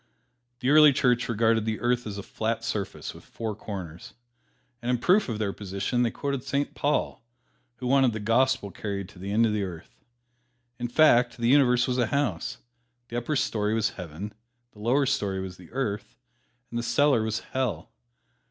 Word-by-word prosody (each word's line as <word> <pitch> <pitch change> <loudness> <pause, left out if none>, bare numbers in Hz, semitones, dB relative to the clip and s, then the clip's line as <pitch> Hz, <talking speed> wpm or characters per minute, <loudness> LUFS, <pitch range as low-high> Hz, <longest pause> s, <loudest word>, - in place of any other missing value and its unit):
The 130 +2 +2
early 150 -1 +8
church 125 -2 +2
regarded 115 0 +2
the 110 0 -2
earth 120 -1 0
as 100 -1 -5
a 100 - -5
flat 115 +2 -2
surface 105 -4 -4
with - - -14
four 110 -2 -5
corners. 90 -6 -8 0.7
And 120 - -3
in 125 - +3
proof 185 - +3
of 110 - -2
their 105 -2 -1
position 100 +5 -2
they 120 - +3
quoted 140 +1 -3
Saint 140 +1 -1
Paul, 145 -4 -1 0.5
who 125 - -8
wanted 130 -1 +4
the 110 - -4
gospel 115 0 +2
carried 100 -2 -4
to 90 - -15
the 100 +2 -5
ends 115 +3 +4
of - - -1
the 105 - 0
earth. 90 -4 -7 0.8
In 120 - -2
fact, 125 -3 +4
the 120 0 +1
universe 125 -3 +5
was 125 0 0
a 120 - +2
house. 125 -11 -1 0.5
The 120 - -3
upper 135 +6 -2
story 105 -5 0
was 110 -2 +1
Heaven, 90 +5 -7 0.4
the 105 - -18
lower 125 +6 +2
story 100 -8 0
was 95 -1 -6
the 90 -2 -14
Earth, 105 - -3 0.5
and 120 - -2
the - - -3
cellar 125 +1 +3
was 110 0 -2
Hell. 130 -3 -2
115 Hz, 185 wpm, -27 LUFS, 105-125 Hz, 0.8 s, early